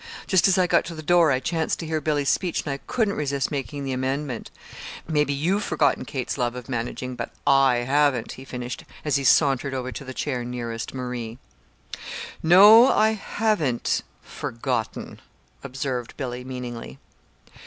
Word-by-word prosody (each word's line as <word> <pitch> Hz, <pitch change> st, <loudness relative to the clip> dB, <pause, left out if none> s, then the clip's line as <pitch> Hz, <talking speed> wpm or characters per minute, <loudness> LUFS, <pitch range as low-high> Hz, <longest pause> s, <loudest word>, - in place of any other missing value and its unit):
Just 185 Hz, -1 st, +4 dB
as 190 Hz, 0 st, +3 dB
I 185 Hz, -, +4 dB
got -, -, +3 dB
to 170 Hz, -, -7 dB
the 155 Hz, -, -8 dB
door 170 Hz, -1 st, +4 dB
I 130 Hz, -, +2 dB
chanced 160 Hz, +4 st, -1 dB
to 165 Hz, -, -6 dB
hear 160 Hz, -1 st, -2 dB
Billy's 145 Hz, -2 st, 0 dB
speech, 180 Hz, +3 st, 0 dB
and 145 Hz, -, -3 dB
I -, -, -4 dB
couldn't 220 Hz, -5 st, +1 dB
resist 140 Hz, -4 st, -1 dB
making 140 Hz, 0 st, -4 dB
the 135 Hz, -, -3 dB
amendment. 130 Hz, -1 st, -3 dB, 0.6 s
Maybe 150 Hz, -3 st, +1 dB
you've 175 Hz, +9 st, 0 dB
forgotten 145 Hz, -8 st, +1 dB
Kate's 130 Hz, +1 st, -4 dB
love 120 Hz, -1 st, 0 dB
of 125 Hz, -1 st, -8 dB
managing 125 Hz, +1 st, -4 dB
but -, -, -5 dB, 0.2 s
I 135 Hz, -3 st, +4 dB
haven't," 140 Hz, -3 st, +2 dB
he 130 Hz, -, -9 dB
finished, 125 Hz, -2 st, -6 dB, 0.2 s
as 150 Hz, -2 st, +2 dB
he 140 Hz, -, -3 dB
sauntered 135 Hz, -1 st, +3 dB
over 130 Hz, 0 st, -3 dB
to 140 Hz, -, -7 dB
the 130 Hz, -, -7 dB
chair 125 Hz, -4 st, -2 dB
nearest 120 Hz, -1 st, -5 dB
Marie. 125 Hz, -3 st, -5 dB, 1.0 s
"No, 205 Hz, +8 st, +8 dB
I 220 Hz, +1 st, +4 dB
haven't 205 Hz, -, 0 dB, 0.2 s
forgotten," 115 Hz, -2 st, -4 dB, 0.4 s
observed 130 Hz, -2 st, -4 dB
Billy, 125 Hz, -2 st, -4 dB
meaningly. 125 Hz, -, -7 dB
135 Hz, 165 wpm, -24 LUFS, 125-155 Hz, 1.0 s, No